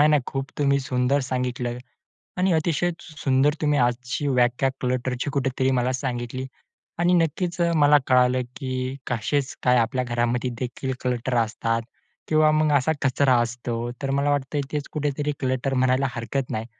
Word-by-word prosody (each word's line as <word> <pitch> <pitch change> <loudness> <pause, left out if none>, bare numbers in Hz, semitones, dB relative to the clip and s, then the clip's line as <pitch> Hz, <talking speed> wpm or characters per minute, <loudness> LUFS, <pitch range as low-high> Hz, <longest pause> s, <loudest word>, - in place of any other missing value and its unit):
नाही-नाही 150 -2 +5
खूप 135 0 -4
तुम्ही 140 -1 +3
सुंदर 130 +2 +1
सांगितलं 125 -1 -2 0.6
आणि 185 0 +3
अतिशय 165 +1 +1
सुं 155 - -13
सुंदर 135 +2 +3
तुम्ही 150 -2 +2
आजची 125 +3 0
व्याख्या 125 0 +2
क्लटरची 125 +1 -1
कुठेतरी 135 -1 0
मला 125 +1 +1
सांगितली 130 -1 -3 0.5
आणि 175 +1 +3
नक्कीच 170 +1 0 0.2
मला 145 -1 +6
कळालं, 125 0 +4
की 130 -1 -3
कसेच 130 +4 -1
काय, 125 0 +4
आपल्या 125 +2 +1
घरामध्ये 120 +1 0
देखील 130 +1 -3
क्लटर 125 0 -1
असतात 115 0 0 0.5
किंवा 155 0 +4
मग 155 0 +2
असा 140 +3 +2
कचरा 130 -1 +3
असतो. 120 0 -3
तर 135 - -1
मला 140 +1 +1
वाटतयं 145 0 -1
तेच 150 -2 -3
कुठेतरी 150 0 -1
क्लटर 130 0 -1
म्हणायला 130 +1 +2
हरकत 120 +3 -3
नाही. 110 +1 -3
130 Hz, 150 wpm, -24 LUFS, 125-145 Hz, 0.6 s, मला